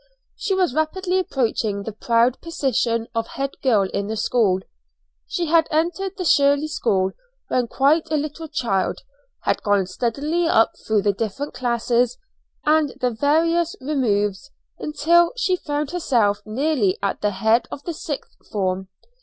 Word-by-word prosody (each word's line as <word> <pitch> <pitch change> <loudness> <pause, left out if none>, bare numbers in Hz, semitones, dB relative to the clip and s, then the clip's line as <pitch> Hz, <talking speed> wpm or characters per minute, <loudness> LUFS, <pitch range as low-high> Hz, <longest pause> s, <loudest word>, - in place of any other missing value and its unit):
She 390 - -1
was 365 -8 +1
rapidly 365 +5 0
approaching 225 - -1
the 220 - -5
proud 235 +3 +1
position 245 -8 0
of 230 -1 -1
head 275 0 -3
girl 225 -7 +3
in 200 +1 -3
the 220 +1 -3
school. 210 -4 +2 0.7
She 350 - -1
had 325 0 +3
entered 350 +5 -1
the 365 - -3
Shirley 285 0 +4
School 190 -9 +1 0.4
when 250 -2 +1
quite 285 +7 +2
a 310 - +1
little 305 +2 -4
child, 230 -10 -1 0.4
had - - 0
gone 205 -2 +2
steadily 285 - -1
up 225 -8 +4 0.2
through 215 -2 +2
the 205 -1 +2
different 225 +8 -4
classes 240 0 0 0.5
and 305 -2 +3
the 250 -2 +1
various 325 +7 +2
removes, 240 -5 0 0.3
until 330 +5 +3
she 375 -6 +2
found 295 -3 -3
herself 235 -12 +1
nearly 235 -4 +1
at 200 - -1
the 210 - +2
head 220 +4 +2
of 285 - -8
the 340 - -4
sixth 295 -2 -6 0.2
form. 190 -2 -1
260 Hz, 150 wpm, -22 LUFS, 220-315 Hz, 0.7 s, Shirley